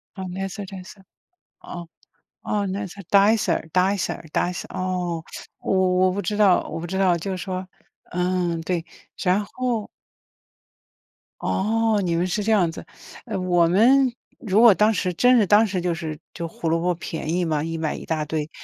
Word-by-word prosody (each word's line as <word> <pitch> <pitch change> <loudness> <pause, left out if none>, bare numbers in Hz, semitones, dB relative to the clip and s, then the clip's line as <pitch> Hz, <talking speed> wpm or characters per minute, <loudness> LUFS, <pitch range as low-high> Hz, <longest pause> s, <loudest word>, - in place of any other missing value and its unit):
呃， 190 - -6
Nicer 195 +2 -5
Dicer。 190 0 -11 0.6
哦， 175 -1 -8 0.6
哦， 205 -1 -1
nicer 200 0 -5
dicer 200 -5 +3
dicer 185 -1 +1
dicer， 180 0 -1
哦， 180 -3 -2 0.4
我 - - -1 0.3
我 185 - +2
不 200 +1 -3
知 210 - -2
道 200 -4 +5
我 - - -4
不 170 - -5
知 190 +2 -4
道， 185 -3 +3
就 190 +4 -4
是 185 - -3
说， 185 0 -5 0.4
嗯， 180 -1 0
对， 170 -1 -2 0.4
然 190 +2 +2
后 240 -1 -3 1.5
哦， 220 +1 +1
你 170 -2 0
们 170 +2 +1
是 205 +3 -1
这 220 - +1
样 180 -6 +3
子。 - - -9 0.4
呃， - - -3
我 175 -2 +3
们 245 +8 +4 0.3
如 215 -1 +2
果 235 -4 +9
当 210 +3 +3
时 185 -3 -1
真 250 +7 +5
是 215 - +4
当 210 +2 +6
时 190 -3 -2
就 175 0 0
是 155 -2 -5 0.2
就 170 -1 -4
胡 165 0 -4
萝 165 +1 +2
卜 180 +1 +1
便 160 -1 -4
宜 180 +1 +1
嘛， 155 -2 0
一 165 0 -3
买 160 -1 -2
一 - - -8
大 155 -2 -1
堆， 155 0 -3
185 Hz, 265 characters per minute, -23 LUFS, 170-205 Hz, 1.5 s, 果